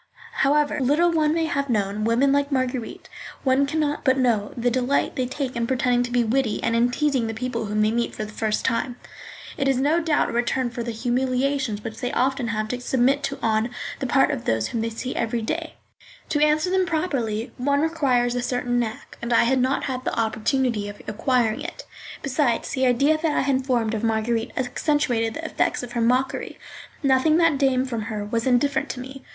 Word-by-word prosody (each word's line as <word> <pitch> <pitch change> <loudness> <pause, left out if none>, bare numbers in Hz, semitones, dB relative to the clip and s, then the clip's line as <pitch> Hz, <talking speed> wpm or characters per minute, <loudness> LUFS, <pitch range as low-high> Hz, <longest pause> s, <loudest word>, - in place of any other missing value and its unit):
However 290 +2 +2
little 295 +7 +3
one 310 -2 +2
may 325 0 +1
have 280 -3 -1
known 210 -1 0
women 240 +5 +3
like 285 +1 +1
Marguerite, 255 -3 -2 0.4
one 270 +1 +3
can 315 +3 -1
not 295 -1 -1
but 260 -1 +3
know 230 -5 +1
the 245 +1 +1
delight 255 +3 0
they 255 -1 -1
take 265 0 -4
in 235 0 -1
pretending 245 -1 +2
to 245 - -2
be 245 -1 +3
witty 235 -1 0
and 230 - +1
in 235 +1 +3
teasing 265 -3 0
the 225 - -4
people 240 -2 -3
whom 210 +1 0
they 215 - +2
meet 235 +1 -1
for 215 - -4
the 210 - -10
first 215 -1 -1
time. 240 +2 0 0.6
It 275 - 0
is 270 -2 +2
no 295 +6 +2
doubt 320 -3 +1
a - - -4
return 240 +1 0
for 235 - -5
the 235 - -4
humiliations 250 -1 -1
which 225 0 -6
they 245 - -2
often 265 -1 0
have 215 -1 -2
to 250 +1 -3
submit 265 +3 +2
to 275 +1 -4
on 220 +1 +1 0.3
the 270 - -2
part 270 +4 +3
of 265 -5 -4
those 110 0 0
whom 230 - -2
they 230 - -1
see 250 +3 -5
every 230 0 -1
day. 320 +7 -3 0.5
To 295 0 +2
answer 310 +4 +2
them 375 -1 +2
properly, 270 -9 -1
one 280 +2 +1
requires 270 -7 +1
a 245 - -1
certain 245 0 -1
knack, 225 -2 -5
and 235 0 -4
I 230 - +5
had 260 +2 +2
not 260 +2 +1
had 255 -1 -3
the - - -2
opportunity 225 -1 0
of 205 - -10
acquiring 230 0 +1
it; - - -7 0.4
besides, 265 -3 0
the 260 -1 +1
idea 280 +6 +3
that 320 -3 0
I - - +3
had 265 -1 0
formed 235 -4 +1
of 220 0 -3
Marguerite 225 0 0
accentuated 250 -3 0
the 325 - -6
effects 315 - 0
of 245 - -7
her 240 - -1
mockery. 250 +3 0 0.5
Nothing 275 +4 +4
that 330 -5 +3
came 265 -2 +2
from 235 -4 -3
her 210 -2 -3
was 230 +3 -2
indifferent 260 +3 +2
to 255 - -5
me. 265 +2 -8
250 Hz, 215 wpm, -23 LUFS, 230-275 Hz, 0.6 s, I